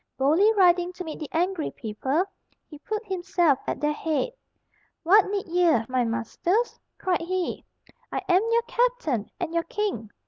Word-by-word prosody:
Boldly 315 +11 +4
riding 360 -3 +4
to 365 - -6
meet 315 -3 -7
the 305 - -6
angry 350 0 0
people, 260 - -1 0.4
he 300 - -12
put 430 +7 -4
himself 355 -7 +1
at - - -2
their 300 0 +1
head. 320 +11 -1 0.7
"What 390 +4 +5
need 400 -1 -2
ye, 345 -3 +4
my 255 -1 +1
masters?" 245 - -1 0.2
cried 365 -3 0
he. 360 +1 -2 0.5
"I - - -1
am 365 +1 +4
your 465 0 +3
captain 475 - 0
and 345 -2 -3
your 335 - +2
king. 380 - -3
350 Hz, 160 wpm, -26 LUFS, 300-390 Hz, 0.7 s, What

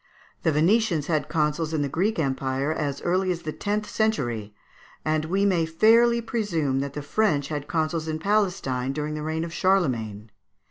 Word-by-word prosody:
The 160 - +2
Venetians 170 0 +2
had 155 -2 -1
consuls 155 0 0
in 150 - +1
the - - 0
Greek 185 +10 0
empire 135 0 -1
as 140 -3 -3
early 185 +2 +1
as 175 -1 -4
the 155 - -3
tenth 210 +1 -2
century, 130 - -1 0.5
and 155 0 +1
we 195 +5 +1
may 175 -5 +2
fairly 230 +8 +4
presume 175 - -1
that 140 0 -3
the 150 - -5
French 145 -4 +1
had 145 -2 -4
consuls 160 -1 -1
in 155 0 -2
Palestine 170 -9 0
during 150 +1 -3
the 155 - -4
reign 160 +1 -2
of 165 0 -6
Charlemagne. 115 - 0
160 Hz, 175 wpm, -25 LUFS, 145-195 Hz, 0.5 s, fairly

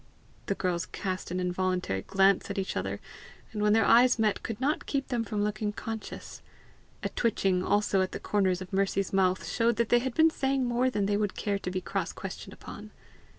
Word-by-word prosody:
The 195 - 0
girls 175 -3 -1
cast 185 -2 -4
an 180 +1 -2
involuntary 180 - -1
glance 195 - +3
at - - -4
each 195 -1 -2
other, 100 +1 -2 0.5
and 210 - -4
when 210 0 +4
their 220 -2 +4
eyes 245 +2 +6
met, 215 -2 +1
could 225 -3 -5
not 285 +4 0
keep 275 -2 -1
them 240 -2 0
from 210 -1 -2
looking 210 0 -1
conscious. 220 +1 -7 0.6
A - - 0
twitching 195 -5 +1
also 205 -1 +2
at 185 - -1
the - - -5
corners 190 -3 +1
of 185 - -14
Mercy's 195 0 0
mouth 185 -1 +2
showed 235 0 +2
they 235 +1 +3
had 255 0 -3
been 320 0 +5
saying 270 -3 0
more 245 +1 +2
than 205 -5 0
they 205 0 +1
would 205 -2 -1
care 200 -2 -1
to 180 - -4
be 185 0 -2
cross - - -3
questioned - - -7
upon. - - -10
205 Hz, 200 wpm, -29 LUFS, 185-230 Hz, 0.6 s, eyes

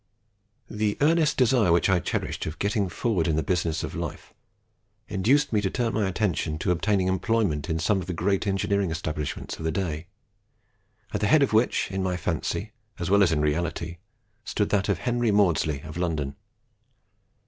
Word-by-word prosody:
"The 105 -1 -1
earnest 155 +1 +3
desire 120 -7 +4
which 85 -1 +4
I 95 -2 +3
cherished 85 - -3
of 80 +2 -5
getting 100 -1 0
forward 95 -5 0
in 80 - +1
the 80 - 0
real - - -14
business 85 -3 0
of - - -5
life - - -6 0.7
induced 115 +8 +2
me 105 - +3
to 95 - 0
turn 120 +2 -1
my 105 -3 +1
attention 90 -5 -1
to 85 - 0
obtaining 95 +2 +1
employment 95 - 0
in 80 - 0
some 95 +5 +1
of 90 - -8
the 90 - -2
great 95 +4 0
engineering 100 0 +1
establishments 80 -2 -4
of - - -6
the 80 - 0
day, 80 -3 -3 1.1
at - - -1
the 105 - +2
head 150 +6 +5
of 135 - 0
which, 110 -1 +2
in 95 0 -2
my 90 -1 -1
fancy 90 +5 -2 0.3
as 85 +1 -3
well 100 0 +5
as 90 -4 +4
in 75 -2 +1
reality, 85 +2 -1 0.5
stood 105 -2 -1
that 100 0 +1
of 100 - +2
Henry 120 +3 0
Maudslay, 85 -8 +2
of 80 +1 -8
London. 75 -6 -2
95 Hz, 185 wpm, -26 LUFS, 80-105 Hz, 1.1 s, head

